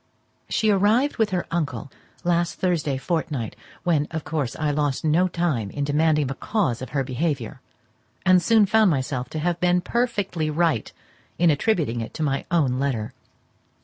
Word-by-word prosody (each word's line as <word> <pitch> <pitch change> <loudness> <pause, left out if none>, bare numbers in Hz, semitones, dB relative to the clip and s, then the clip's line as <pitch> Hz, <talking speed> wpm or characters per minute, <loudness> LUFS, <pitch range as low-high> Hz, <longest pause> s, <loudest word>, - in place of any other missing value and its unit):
She 215 -1 +2
arrived 215 +8 +2
with 220 -3 +2
her 180 -3 -1
uncle 155 -4 -2 0.3
last 175 0 +1
Thursday 160 -7 0
fortnight, 145 -6 -2 0.3
when, 155 -4 +1
of 160 -1 -4
course, 145 -6 -2
I 150 -1 0
lost 145 0 -1
no 165 +4 +3
time 165 - -1
in 145 +7 -3
demanding 150 +1 +2
the 135 - -3
cause 155 - -1
of 130 - -6
her 140 0 0
behaviour; 130 -2 -3 0.6
and 185 0 +6
soon 220 +4 +5
found 220 0 +4
myself 130 -4 -1
to - - -6
have 170 +2 -1
been 180 0 +3
perfectly 200 -6 -1
right 155 -6 0 0.5
in 170 -1 +4
attributing 145 - 0
it 115 - -7
to 160 - -2
my 140 -2 -1
own 140 -8 +1
letter. 125 -6 -2
160 Hz, 165 wpm, -24 LUFS, 140-180 Hz, 0.6 s, and